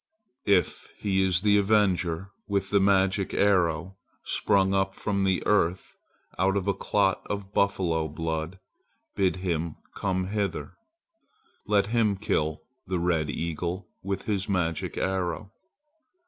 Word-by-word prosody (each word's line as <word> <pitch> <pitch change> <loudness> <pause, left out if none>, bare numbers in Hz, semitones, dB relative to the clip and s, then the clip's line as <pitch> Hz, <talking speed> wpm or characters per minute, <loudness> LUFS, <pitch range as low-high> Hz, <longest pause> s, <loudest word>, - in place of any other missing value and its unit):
"If 100 -3 +2
he 95 -2 +1
is 90 -2 +2
the 105 0 +4
avenger 95 -3 +1 0.2
with 100 -1 -1
the 100 - +4
magic 95 0 +2
arrow, 95 -2 +2 0.3
sprung 95 -1 +2
up 95 0 +1
from 100 -2 -1
the 95 -1 +1
earth 90 -3 +1 0.5
out 95 +1 +3
of 100 0 -2
a 100 - +3
clot 95 0 +1
of 100 -1 -4
buffalo 85 -5 +1
blood, 80 +3 -3 0.6
bid 95 -2 +2
him 85 -3 -2 0.2
come 95 -1 -1
hither. 100 -2 -2 0.9
Let 100 -1 +3
him 110 -4 +3
kill 80 -6 -1 0.2
the 95 - -1
red 85 -3 +1
eagle 85 +4 -3
with 100 0 -3
his 100 -2 -2
magic 85 -4 -1
arrow. 95 +1 -2
95 Hz, 130 wpm, -27 LUFS, 85-100 Hz, 0.9 s, the